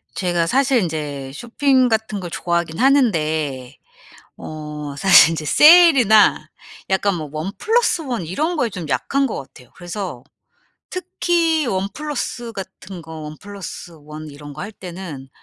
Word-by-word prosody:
제가 175 -3 0
사실 270 +1 +2
인제 145 -5 -4
쇼핑 255 - +1
같은 220 -2 -1
걸 180 -2 -6
좋아하긴 170 -1 -2
하는데 155 - +1 0.6
어 150 -2 -7
사실 195 -2 +7
인제 160 -2 -4
세일이나 280 - +6 0.4
약간 195 0 +1
뭐 155 -4 -6
원 155 +5 -4
플러스 455 -6 +1
원 245 - -4
이런 310 - -2
거에 245 -5 +1
좀 180 -6 -7
약한 275 - 0
것 225 - -5
같아요. 130 -2 -14
그래서 175 - -6 0.7
특히 335 -3 0
원 190 -3 -1
플러스 275 -5 -4
같은 190 -2 -9
거 160 -1 -9
원 150 0 -8
플럿 200 -1 -11 0.4
원 155 +1 -9
이런 145 0 -11
거 - - -8
할 205 +4 -6
때는 175 -9 -9
185 Hz, 265 characters per minute, -20 LUFS, 155-250 Hz, 0.7 s, 사실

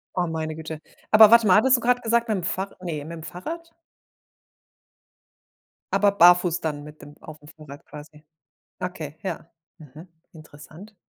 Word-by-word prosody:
Oh, 180 -1 -1
meine 160 -1 -4
Güte. 160 -1 -8 0.3
Aber 215 -1 +8
warte 235 -2 +6
mal, 185 - +5
hattest 260 +3 +4
du - - -8
gerade 245 +1 +1
gesagt: 235 0 0
„Mit'm 190 -5 -2
Fahr", 190 +3 -4
ne, 155 -5 -5
„Mit’m 165 -1 -9
Fahrrad.“? 325 - -8 2.2
Aber 200 +1 +3
barfuß 180 -2 +4
dann 150 -2 -5
mit 150 +1 -14
dem 145 - -14
auf’m 150 -1 -13
Fahrrad 150 -3 -14
quasi. 150 0 -14 0.6
Okay, 160 -5 -7
ja, 170 -3 -6 0.3
mhm, 155 +3 -14 0.3
interessant. 155 +6 -15
170 Hz, 145 wpm, -23 LUFS, 155-205 Hz, 2.2 s, Aber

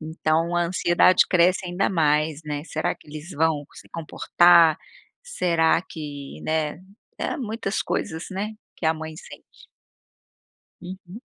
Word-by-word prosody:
Então 160 +1 -1
a 175 - +2
ansiedade 175 +1 +4
cresce 180 +1 +3
ainda 180 +2 0
mais, 155 -2 +1
né, 150 -1 -4
será 155 -2 -2
que - - -22
eles 155 +3 -9
vão 155 -2 0
se - - -14
comportar? 170 0 +4 0.5
Será 170 - +1
que, 145 -5 -8
né, 155 0 -1 0.4
é - - -2
muitas 220 -5 -3
coisas, 160 +2 -3
né, 200 +3 -3 0.2
que 165 - -2
a 160 - +3
mãe 160 0 -7
sente. - - -14 1.2
Uhum. 185 +3 -10
165 Hz, 130 wpm, -24 LUFS, 155-180 Hz, 1.2 s, ansiedade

